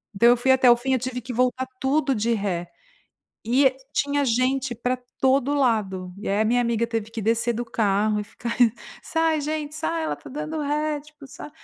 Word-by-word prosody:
Então 235 +4 +5
eu 245 - +5
fui 265 +2 +2
até 260 -1 +5
o 240 - +8
fim, 265 +2 -1
eu 255 - +2
tive 250 0 -4
que 250 +2 -7
voltar 255 +2 0
tudo 275 +1 +1
de 230 +2 +1
ré 185 -5 -2 0.8
e 260 +3 +3 0.2
tinha 285 0 +1
gente 255 +1 0
pra 250 +2 -1 0.2
todo 270 +1 +2
lado. 195 -9 0
E 205 - -7
aí 205 +2 +2
a - - +2
minha 245 +2 +2
amiga 235 -1 0
teve 225 -2 -3
que 230 -2 -5
descer 230 +2 +1
do 240 +2 -3
carro 210 -1 +1
e - - -3
ficar 235 +3 -6 0.5
"Sai 325 -2 +1
gente, 300 0 -3
sai 330 +1 -2
ela - - -1
está - - -11
dando 305 +3 -4
ré", 300 +1 -1
tipo, 300 -1 -15
"sai" 295 - -10
250 Hz, 205 wpm, -24 LUFS, 225-280 Hz, 0.8 s, o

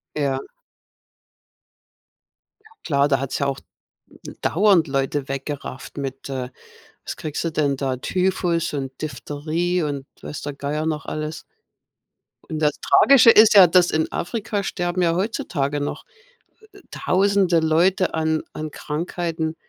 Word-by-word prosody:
Ja. 140 -3 0 2.5
Klar, 140 -3 +2
da 135 -3 +2
hat 135 -1 -4
es - - -1
ja 140 - 0
auch 135 -1 -2 0.5
d - - -12
dauernd 190 -2 +3
Leute 135 0 -1
weggerafft 135 0 -6
mit 135 -1 -5
äh, 130 -2 -4 0.6
was - - -5
kriegst 155 -1 -4
du 165 - 0
denn 145 -3 0
da, 130 -1 -2
Typhus 175 +2 0
und 135 -2 -4
Diphtherie 155 +5 -2
und 140 -3 -3 0.2
weiß 150 - -7
der 145 - -4
Geier 145 +2 -3
noch 150 -2 -2
alles. 155 +1 -4 1.1
Und 155 - -4
das 150 -2 +1
Tragische 270 -4 +6
ist 220 0 +7
ja, 195 -3 +10
dass 175 +1 +4
in 160 0 0
Afrika 210 +1 -3
sterben 180 -1 -2
ja 165 -1 +2
heutzutage 155 -8 -2
noch, 145 - -4 0.7
äh 400 - -17
äh, - - -19
tausende 190 -2 +2
Leute 170 +4 +2
an 160 0 0
an 155 0 -5
Krankheiten, 160 +1 -3
155 Hz, 140 wpm, -22 LUFS, 140-175 Hz, 2.5 s, ja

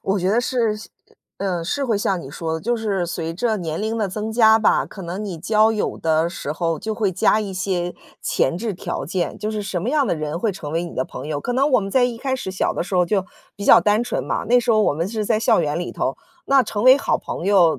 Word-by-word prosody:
我 195 +1 0
觉 185 +1 0
得 235 +3 +3
是， 235 -4 0
像 215 - -11 0.5
呃， 180 -4 -1
是 275 +11 -1
会 225 -5 +1
像 195 -3 0
你 135 - -9
说 160 +1 -3
的， 160 - -3
就 240 +3 0
是 200 -5 -1
随 165 -1 -4
着 220 +2 0
年 165 0 -4
龄 220 +1 -2
的 205 -3 0
增 215 +3 -4
加 220 -1 +6
吧， 215 - +2
可 195 - -10
能 180 +5 -5
你 190 -5 -5
交 215 +6 +3
友 215 -2 -2
的 160 +1 +1
时 145 - -5
候 165 0 -1
就 220 -1 -3
会 205 -4 0
加 190 +4 +3
一 200 -2 -4
些 180 -2 -2 0.3
前 170 - +1
置 220 +2 -3
条 175 - -4
件， 175 +3 -2
就 215 - -3
是， 215 -1 -3
什 185 -3 -3
么 240 - -1
样 290 -3 +2
的 - - +1
人 155 +1 -3
会 215 +4 0
成 165 -6 -7
为 165 +1 0
你 170 - -8
的 130 - -1
朋 - - -8
友。 150 -1 -2
可 245 - -3
能 275 +4 +2
我 250 - +6
们 195 0 -4
在 255 +1 +4
一 240 -2 -1
开 265 +2 -2
始 220 -7 -4
小 190 - 0
的 - - -2
时 185 - -5
候 180 - +4
儿 - - -1
就 195 -2 0 0.3
比 200 - -7
较 - - +8
单 210 +2 +2
纯 240 - -3
嘛， - - -2
那 245 +1 +6
时 240 - 0
候 215 - +4
我 175 - +2
们 165 +4 -1
是 215 0 -3
在 220 0 +2
校 225 -4 +3
园 150 +1 -1
里 175 - -4
头， - - -2 0.3
那 270 -1 +5
成 210 -1 -3
为 260 +1 +9
好 - - 0
朋 - - -6
友 185 -5 +4
200 Hz, 300 characters per minute, -21 LUFS, 170-225 Hz, 0.5 s, 为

